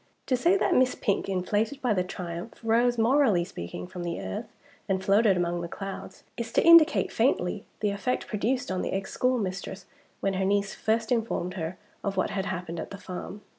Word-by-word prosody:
To 255 - +2
say 340 +10 +3
that - - +2
Miss 255 0 +3
Pink, 200 -1 -1
inflated 205 +7 0
by 250 -5 +1
the 185 -3 +1
triumph, 180 +3 -6
rose, 235 +2 +3
morally 230 -5 +4
speaking, 90 - -7
from 175 - -8
the 170 -1 -3
earth 95 0 -5 0.4
and 190 0 0
floated 200 -1 +4
among 175 0 0
the 170 - -4
clouds, 195 +1 -7
is 235 -1 -4
to - - +3
indicate 335 -2 +7
faintly - - +1 0.2
the 210 -1 +1
effect 200 +5 -1
produced 240 +4 -1
on 185 - -1
the - - -2
ex 195 0 -3
schoolmistress 195 -6 -1 0.3
when 195 - 0
her 190 0 0
niece 200 +1 +1
first 220 +1 0
informed 225 -6 0
her 170 -1 -4 0.3
of 200 -2 -2
what 185 - +1
had 195 0 -2
happened 175 -3 -4
at - - -5
the 200 - -7
farm. 195 +1 -7
200 Hz, 195 wpm, -27 LUFS, 180-230 Hz, 0.4 s, indicate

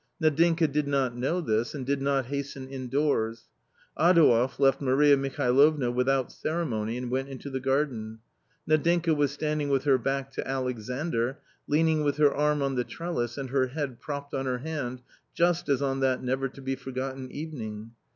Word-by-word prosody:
Nadinka 165 +1 +3
did 150 0 -1
not 135 -4 0
know 135 +9 -1
this, 115 -2 -1
and 135 -3 -5
did 140 +1 0
not 135 -1 +1
hasten 140 0 -5
indoors. 130 -4 -1 0.5
Adouev 150 -7 +4
left 135 0 +3
Maria 140 +2 +5
Mihalovna 135 0 +2
without 130 +1 +1
ceremony 120 -9 -2
and 125 -1 -4
went 135 +1 -1
into 135 +1 -7
the 130 - -2
garden. 130 -5 -1 0.5
Nadinka 165 +2 +3
was 145 -1 +2
standing 150 0 -2
with 135 -2 +1
her 135 -3 +4
back 135 +2 -2
to - - -5
Alexandr, 125 0 -2 0.3
leaning 155 +1 +2
with 145 0 0
her 145 -2 +4
arm 150 0 +1
on 135 0 0
the 125 -1 0
trellis 120 -7 -4
and 135 -2 -5
her 130 -1 +2
head 135 -2 -4
propped 140 -1 -6
on 135 0 -2
her 125 -1 0
hand, 130 -3 -5 0.3
just 170 -1 +1
as 140 0 +2
on 135 -1 0
that 130 -1 +1
never 130 +1 -1
to 135 +1 -13
be 135 0 -1
forgotten 130 0 -5
evening. 115 -8 -6
135 Hz, 170 wpm, -27 LUFS, 125-150 Hz, 0.5 s, Maria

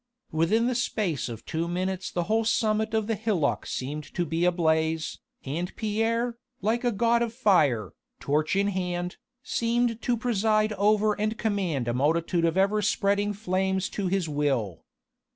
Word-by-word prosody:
Within 165 +9 +2
the 255 - +1
space 210 - -1
of 115 -2 -8
two 165 +1 -2
minutes 185 +2 -2
the 175 - -1
whole 220 +5 +1
summit 220 0 +1
of 220 -1 +1
the 225 - 0
hillock 205 -9 0
seemed 145 +4 -4
to 175 - 0
be 165 +2 0
ablaze, 160 -2 +1 0.3
and 170 +7 -3
Pierre, 230 +2 -1 0.2
like 225 +5 0
a 245 - +2
god 235 +2 +2
of 235 -1 -1
fire, 145 - +2 0.3
torch 150 +4 0
in 200 +1 +2
hand, 180 -2 -3 0.3
seemed 235 0 0
to 245 -1 +1
preside 215 -2 +1
over 210 +1 +3
and 215 +1 0
command 190 - -1
a 120 - 0
multitude 165 +6 +1
of 165 +2 +1
ever 200 +2 +3
spreading 205 0 +1
flames 190 -1 -1
to 200 -2 -2
his 185 -2 0
will. 135 - -1
195 Hz, 160 wpm, -27 LUFS, 165-220 Hz, 0.3 s, over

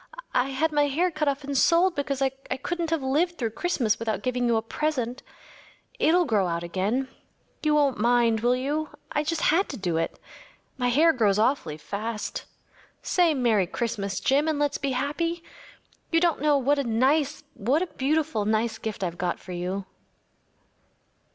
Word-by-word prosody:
I 250 - +3
had 310 +4 0
my 295 -1 +3
hair 340 +6 +1
cut 305 -1 -2
off 280 +1 0
and 280 0 -4
sold 340 +6 +4
because 280 -3 -2
I 270 - +3
couldn’t 275 +6 -4
have 325 -4 0
lived 330 +7 +1
through 230 -3 -2
Christmas 245 -7 0
without 225 -1 -2
giving 250 -1 0
you 235 - +3
a 220 - -1
present. 255 -1 -2 0.8
It’ll 350 +3 +4
grow 210 - +2
out 170 0 -2
again‚ÄĒyou 245 - -3
won’t 280 -5 +2
mind, 235 0 +3
will 240 +3 +2
you? 295 +4 -2 0.2
I 295 - 0
just 320 +1 -2
had 380 +4 +2
to 270 - -5
do 175 -5 -1
it. 165 - -2 0.6
My 250 -2 -1
hair 320 +7 +5
grows 210 -6 +2
awfully 215 - +1
fast. 210 +8 -5 0.6
Say 345 -4 +3
‚ÄėMerry 220 -8 +2
Christmas!’ 215 -5 -2
Jim, 285 +3 +2
and 310 -2 +1
let’s 290 -1 0
be 275 -1 -1
happy. 330 +6 -2 0.7
You 330 - +3
don’t 340 -5 +1
know 295 -1 +4
what 280 +2 +2
a - - +1
nice‚ÄĒwhat 270 +2 0
a 365 - -8
beautiful, 295 -4 0
nice 220 +2 0
gift 215 -3 -4
I’ve 175 -1 -3
got 175 -1 -1
for 185 - -11
you. 180 +2 -3
265 Hz, 170 wpm, -26 LUFS, 220-305 Hz, 0.8 s, hair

